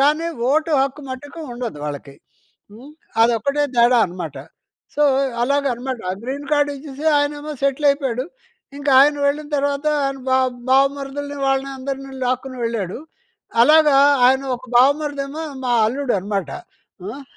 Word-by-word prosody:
కానీ, 300 +4 +2 0.2
ఓటు 315 +3 +1
హక్కు 275 +2 -3
మటుకు 290 +6 -8
ఉండదు 240 -10 -5
వాళ్ళకి. 145 -1 -6 0.6
హ్మ్, 260 +7 -13 0.3
అదొక్కటే 240 +6 +1
తేడా 240 +1 +5
అనమాట. 170 -5 -7 0.6
సో, 295 - +1 0.4
అలాగనమాట. 260 -2 -1 0.2
గ్రీన్ 280 +3 -5
కార్డ్ 290 -1 +3
ఇచ్చేసి, 285 +2 -7
ఆయనేమో 290 +1 -2
సెటిల్ 275 +1 +2
అయిపోయాడు. 265 -3 -2 0.5
ఇంకాయన 285 0 +4
వెళ్ళిన 295 +1 -1
తర్వాత 285 +1 -1 0.2
ఆయన 275 0 -2
బా 260 - +3 0.3
బావమరుదులని 280 +1 0
వాళ్ళని 270 0 0
అందరిని 270 0 -6
లాక్కుని 255 +1 -2
వెళ్ళాడు. 225 -4 -3 0.6
అలాగా 300 +1 +5 0.3
ఆయన 265 +2 +3
ఒక 255 - -15
బావమరిదేమో 285 +3 +1 0.2
మా 245 - 0
అల్లుడనమాట. 205 - -2 0.5
హ్మ్, 225 +9 -7
275 Hz, 120 wpm, -20 LUFS, 245-285 Hz, 0.6 s, తేడా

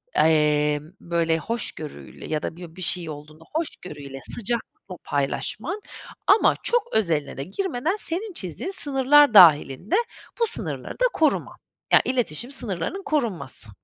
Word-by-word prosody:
emm, 150 -1 +2
böyle, 170 -1 0
hoşgörüyle 165 -6 -4
ya 155 -1 -2
da - - -4
bir 170 -2 -11
bir 185 - -10
şey 175 -1 -2
olduğunda 155 +2 -10
hoşgörüyle, 145 - -5 0.2
sıcaklıkla 230 -4 -5
paylaşman 220 - -2 0.5
ama 415 +3 +5
çok 485 -3 0
özeline 165 -12 0
de 135 - -3
girmeden, 320 - -2
senin 380 +5 -1
çizdiğin 190 - -3
sınırlar 285 - +5
dâhilinde 165 - +6 0.4
bu 465 - +3
sınırları 455 - -2
da - - +3
koruman 310 -2 0 0.4
ya - - +8
iletişim 245 - -2
sınırlarının 240 - -2
korunması, 185 - -1
185 Hz, 125 wpm, -24 LUFS, -, 0.5 s, ya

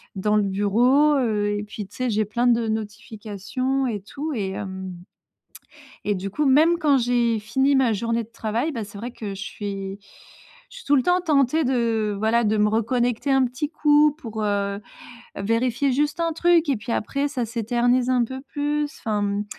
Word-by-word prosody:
dans 210 +2 +1
le 210 - +3
bureau, 235 +10 +3
heu, 215 -5 0
et 205 - -3
puis 210 0 -7
tu 200 - -18
sais, 255 -1 -1
j'ai 215 0 +1
plein 235 +4 -1
de 235 -1 +2
notifications, 220 +4 -3
et 210 -5 -3
tout. 290 +10 -5
Et 195 -3 -2
hem, 190 -1 -6 1.1
et 205 - +1
du 190 +2 -4
coup, 300 +9 -1
même 315 +6 +5
quand 290 -5 +3
j'ai 240 -2 +1
fini 265 +6 +1
ma 260 -4 +3
journée 230 +2 -1
de 225 - -22
travail, 230 +7 -2
bah, 230 -5 -4
c'est 205 0 -12
vrai 240 +4 -5
que 215 -4 -6
je 195 - -8
suis 195 -1 -5 0.7
je - - -13
suis 485 - -13
tout 290 - +4
le 260 - +3
temps 360 +4 +2
tentée 310 -2 +2
de, 230 -5 0
voilà, 225 +3 +2
de 215 0 +2
me 210 0 +3
reconnecter 240 +4 0
un 270 -1 +4
petit 255 +4 -3
coup 300 -1 +4
pour, 220 -6 -5
heu, 200 -1 -1 0.6
vérifier 235 +6 0
juste 295 +5 0
un 335 0 +1
truc 335 -1 +3
et 275 - +3
puis 220 +2 -6
après 275 +7 -1
ça 265 -4 -3
s'éternise 240 +2 +1
un 250 -2 +3
peu 260 +3 -7
plus, 295 +1 -2
enfin 210 -2 -1
mmh, 200 +1 -1
235 Hz, 195 wpm, -23 LUFS, 210-275 Hz, 1.1 s, même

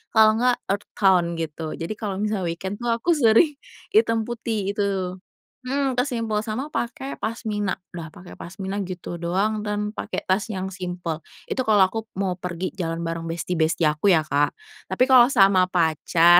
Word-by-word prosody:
kalau 220 0 +6
enggak 250 0 +3 0.2
earth 200 - -2
tone 180 -4 +3
gitu, 160 -1 -4
jadi 165 +4 -5
kalau 205 -4 -3
misal 210 -4 -1
weekend 190 +5 -4
tuh 240 - -4
aku 235 +10 +1
sering 285 +1 +5 0.4
hitam 230 - +3
putih 220 -3 -2
gitu. 190 -3 -1 0.5
Mhm, 270 -1 0
ke - - +4
simpel, 230 -5 -1
sama 260 +8 -4
pakai 265 +3 -4
pasmina, 215 -3 -2 0.2
dah 170 -2 -6
pakai 180 - -12
pasmina 190 +2 -5
gitu 175 -2 -6
doang 205 +5 0
dan 210 0 -1
pakai - - -4
tas 190 +3 +1
yang 190 -3 -4
simpel. 180 -3 -4 0.3
Itu 260 - -1
kalau 210 -3 +6
aku 225 - -2 0.2
mau 190 -2 -1
pergi 180 +1 -3
jalan 165 -1 -2
bareng 165 0 -3
besti-besti 165 0 0
aku 150 +5 +2
ya 160 - +2
Kak, 145 -1 +1 0.3
tapi 255 - +2
kalau 250 -2 +8
sama 195 -7 +5
pacar 170 0 +5
195 Hz, 170 wpm, -24 LUFS, 175-220 Hz, 0.5 s, kalau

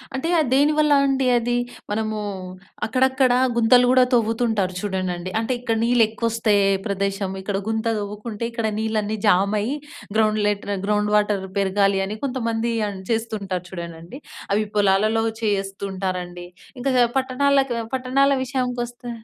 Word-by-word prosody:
అంటే 265 +5 -2
అది 285 -6 +1
దేనివల్ల 300 +2 +3
అండి 270 -1 +1
అది. 240 0 +1 0.4
మనము, 215 0 -1 0.7
అక్కడక్కడ 260 +2 +2 0.2
గుంతలు 245 +2 +5
కూడా 255 0 +6
తవ్వుతుంటారు 225 -4 +1
చూడండండి. 185 -3 -3
అంటే, 225 +3 -2
ఇక్కడ 230 -2 -1
నీళ్ళు 240 -1 +4
ఎక్కువ 230 +1 -3
వస్తే 225 -2 +1 0.3
ప్రదేశం 195 0 -1
ఇక్కడ 195 0 -2
గుంత 220 0 -1
తవ్వుకుంటే, 210 +2 -6
ఇక్కడ 230 -2 -2
నీళ్ళన్నీ 220 -1 -1
జామయ్యి 205 +6 +2 0.4
గ్రౌండ్ 215 -1 +2
లెట్ 205 -1 -2 0.2
గ్రౌండ్ 210 0 +1
వాటర్ 205 -2 +1
పెరగాలి 195 0 +2
అని, 210 +2 -5
కొంతమంది 235 -3 -1 0.2
అని 190 -1 -7
చేస్తుంటారు 200 -5 -2
చూడండండి. 170 - -8 0.3
అవి 215 +1 +1
పొలాలలో 210 +2 +3 0.2
చేస్తూ 195 -2 -2
ఉంటారండి. 180 -2 -4 0.3
ఇంకా 270 +2 0 0.3
పట్టణాలకు 270 0 +2 0.2
పట్టణాల 265 +2 +2
విషయానికి 250 -1 -2
వస్తే 245 0 -10
220 Hz, 130 wpm, -22 LUFS, 200-245 Hz, 0.7 s, కూడా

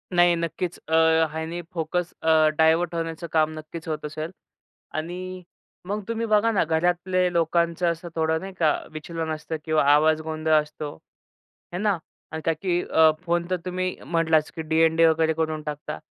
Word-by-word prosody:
नाही 175 0 +5
नक्कीच. 170 +1 -3
अ, 160 - -3 0.4
ह्यानी 160 +2 -4
फोकस 175 +1 -2
अ, 160 -1 +5
डायव्हर्ट 160 +2 +3
होण्याचं 165 0 -4
काम 155 -1 +3
नक्कीच 155 +1 -8
होत 155 -1 -3
असेल 155 +2 -5 0.7
आणि 180 +3 -5 0.4
मग 205 +2 -2
तुम्ही 230 0 -2
बघा 215 +1 +3
ना 205 - +2
घरातले 175 +3 +1
लोकांचं 170 +1 +1
असं 170 +1 -7
थोडं 160 0 +1
नाही 195 0 -7
का 155 -3 +4 0.2
विचलन 160 +1 -5
असतं 155 +1 -5
किंवा 155 -1 +2
आवाज 155 +1 +4
गोंधळ 155 0 -1
असतो, 150 0 -7 0.8
आहे 180 - -3
ना? 205 -3 +2 0.3
आणि 160 0 -4
का 165 - +3
की 180 -2 +1
अ, 160 0 +5
फोन 170 0 +1
तर 185 - +1
तुम्ही 185 0 -2
म्हटलाच 160 -2 +2
की 165 - -4
डी-एन-डी 160 +1 +3
वगैरे 160 0 +3
करून 155 -1 -2
टाकता. 150 - -5
165 Hz, 165 wpm, -25 LUFS, 160-175 Hz, 0.8 s, नाही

